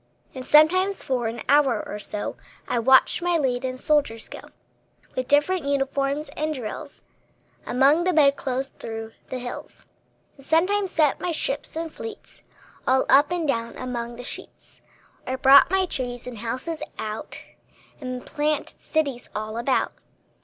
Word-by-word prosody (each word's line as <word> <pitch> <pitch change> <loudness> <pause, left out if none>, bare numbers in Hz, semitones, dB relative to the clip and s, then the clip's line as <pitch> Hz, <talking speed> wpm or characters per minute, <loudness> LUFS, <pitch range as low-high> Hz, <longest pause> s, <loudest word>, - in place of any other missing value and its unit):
And 260 - -6
sometimes 370 +8 +4
for 250 -3 -1
an 230 +1 -5
hour 285 -1 +3
or 210 - -5
so 205 0 -4 0.3
I 240 - 0
watched 265 +7 +5
my 350 -1 +2
leaden 255 -2 -1
soldiers 275 -6 0
go, - - -8 0.8
With 255 -1 -2
different 295 +4 +2
uniforms 280 +1 0
and 305 +2 -2
drills, 230 -5 -7 0.6
Among 275 +7 +4
the 365 - +2
bed 290 -4 +5
clothes, 265 0 -3
through 225 0 -6 0.2
the 260 - -3
hills; 245 -1 -8 0.5
And 275 - -16
sometimes 380 +5 +2
sent 305 -4 +2
my 355 - -2
ships 290 -2 -3
in 325 0 -3
fleets 445 +5 -10 0.5
All 260 0 +3
up 285 +2 +6
and 345 -3 -1
down 230 -4 -1
among 240 -2 -4
the 245 - -8
sheets; - - -8 0.5
Or 260 +1 -1
brought 270 +3 +7
my 380 +1 +2
trees 245 -7 -4
and 245 -3 -7
houses 255 +8 -4 0.2
out, 215 0 -6 0.6
And 255 -1 -5
planted 300 -1 -2
cities 280 -6 -1
all 215 +1 -4
about. 240 +3 0
275 Hz, 150 wpm, -24 LUFS, 245-310 Hz, 0.8 s, brought